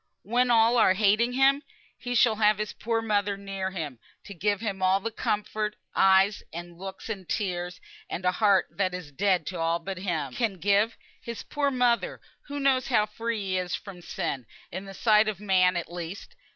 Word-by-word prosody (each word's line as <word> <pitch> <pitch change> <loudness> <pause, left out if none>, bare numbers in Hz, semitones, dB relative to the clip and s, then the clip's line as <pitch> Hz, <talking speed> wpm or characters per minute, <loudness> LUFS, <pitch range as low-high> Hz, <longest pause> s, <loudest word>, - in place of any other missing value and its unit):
When 245 +4 +1
all 230 +1 +5
are 190 -5 +5
hating 215 +4 +3
him, 270 +2 +4 0.3
he 245 0 -4
shall 225 -2 +4
have 210 -1 +4
his 215 0 -3
poor 225 0 -1
mother 205 -2 0
near 195 -1 -4
him, 155 -10 -5 0.2
to 200 - -9
give 205 +2 0
him 200 -4 -4
all 185 +1 +3
the 230 +3 -4
comfort, 210 0 -2 0.2
eyes, 195 +2 +4
and 175 +1 -8
looks, 190 0 -7
and 195 -5 -6
tears, 180 -4 -2 0.3
and 185 - -4
a 180 - +4
heart 200 0 +3
that 185 -2 -1
is 170 -5 -8
dead 185 +4 +1
to 180 -2 -5
all 165 +1 +1
but 185 +2 -6
him, 165 -8 -2
can 225 -5 -1
give; 205 +5 +2 0.2
his 235 -1 -6
poor 290 -1 -1
old 275 - -1
mother, 245 -1 +1 0.3
who 285 0 -4
knows 270 -2 +2
how 215 -5 +3
free 225 +1 -3
he 190 -1 -1
is 180 -1 -2
from 195 -3 -9
sin 130 -7 -4 0.2
in 190 +2 -5
the 195 0 -9
sight 215 0 +4
of 210 -4 -2
man 185 -3 +3
at 170 -1 -4
least. 175 +3 -7
200 Hz, 200 wpm, -27 LUFS, 185-225 Hz, 0.3 s, all